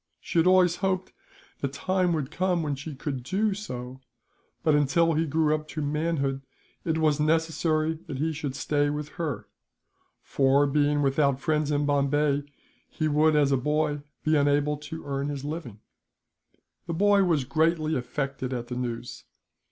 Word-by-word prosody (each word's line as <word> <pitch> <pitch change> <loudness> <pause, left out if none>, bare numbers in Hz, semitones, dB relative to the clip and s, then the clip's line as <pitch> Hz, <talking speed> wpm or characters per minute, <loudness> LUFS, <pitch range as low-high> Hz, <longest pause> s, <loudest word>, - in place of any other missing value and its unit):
She 170 - -1
had 165 - +4
always 185 -2 +5
hoped 185 -1 -1 0.5
the 140 - -1
time 180 +6 0
would 150 -3 -2
come 180 0 0
when 145 -2 -1
she 140 +2 -6
could 135 -1 -4
do 200 - 0
so 130 -10 -7 0.6
but, 155 - +3
until 150 +3 +3
he 160 +1 +1
grew 155 +1 +2
up 155 0 -2
to 155 - -5
manhood, 145 -2 -1 0.4
it 160 -1 0
was 155 -2 +2
necessary 160 0 +1
that 145 -4 -5
he 160 +3 -1
should 145 -3 -4
stay 145 +1 +1
with 150 0 -4
her; 150 -10 -3 0.8
for, 140 +1 +3
being 145 +1 +2
without 140 -1 +2
friends 150 0 0
in 145 0 +1
Bombay 145 0 +2 0.5
he 155 - -1
would, 155 +1 +3
as 145 -2 +3
a 135 - +4
boy, 150 +2 0 0.2
be 155 0 +2
unable 145 0 +2
to 160 +2 -8
earn 140 0 -2
his 140 -1 -5
living. 145 -9 -6 1.1
The 170 - -2
boy 200 +2 +4
was 165 -7 +2
greatly 155 +3 +1
affected 130 +1 -3
at 120 -1 -4
the 125 - -4
news. 120 -1 -5
150 Hz, 165 wpm, -27 LUFS, 140-160 Hz, 1.1 s, always